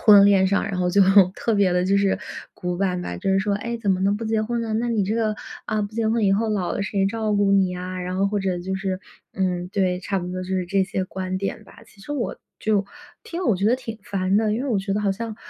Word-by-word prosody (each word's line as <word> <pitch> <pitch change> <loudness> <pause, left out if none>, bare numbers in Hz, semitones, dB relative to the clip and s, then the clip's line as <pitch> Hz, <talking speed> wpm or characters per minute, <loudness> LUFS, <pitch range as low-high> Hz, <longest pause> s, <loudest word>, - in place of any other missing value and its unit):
婚 205 -3 +8
恋 195 -2 +5
上， 200 +1 +2
然 195 -2 -3
后 180 - +1
就 195 +2 +5 0.3
特 230 - -1
别 195 -3 +3
地 180 0 +2
就 195 +1 +3
是 200 -1 +2 0.4
古 180 0 -3
板 180 -2 0
吧， 90 - -5
就 195 - -1
是 190 - +3
说： 200 0 0
“哎， 235 +2 -3
怎 210 -4 -1
么 185 - +2
能 200 +2 +2
不 225 - -5
结 220 0 +1
婚 235 +1 -2
呢， 220 -1 -3
那 235 +2 0
你 225 -4 +1
这 210 +3 -1
个， 215 -2 +1 0.3
啊， 215 -1 0
不 205 +1 -5
结 225 -1 0
婚 225 -1 +1
以 195 - +4
后 220 +3 +1
老 195 -5 -1
了 - - -2
谁 195 0 0
照 215 0 -1
顾 200 -1 +3
你 190 -2 +3
啊？” 185 +1 -5
然 180 +1 -3
后 195 +1 +2
或 205 - -1
者 190 -2 -1
就 190 +2 -3
是 190 -1 -3 0.3
嗯， 180 -2 -1
对， 185 -2 +1
差 195 +1 -2
不 175 - -5
多 185 0 -4
就 185 - -8
是 185 -1 0
这 195 +1 +2
些 190 -1 -2
观 185 0 -4
点 195 0 -4
吧。 215 - -16
其 210 - -21
实 255 +9 -6
我 265 -5 -3 0.2
就 205 -2 +1 0.4
听 350 -5 -5
了 - - -1
我 200 - +3
觉 200 +3 0
得 240 - +4
挺 225 -4 -7
烦 195 0 0
的， 215 -1 +2
因 245 - -2
为 280 - -3
我 215 -5 +1
觉 195 0 -2
得 210 - 0
好 200 -1 +1
像， 220 +2 -4
200 Hz, 305 characters per minute, -23 LUFS, 185-215 Hz, 0.4 s, 婚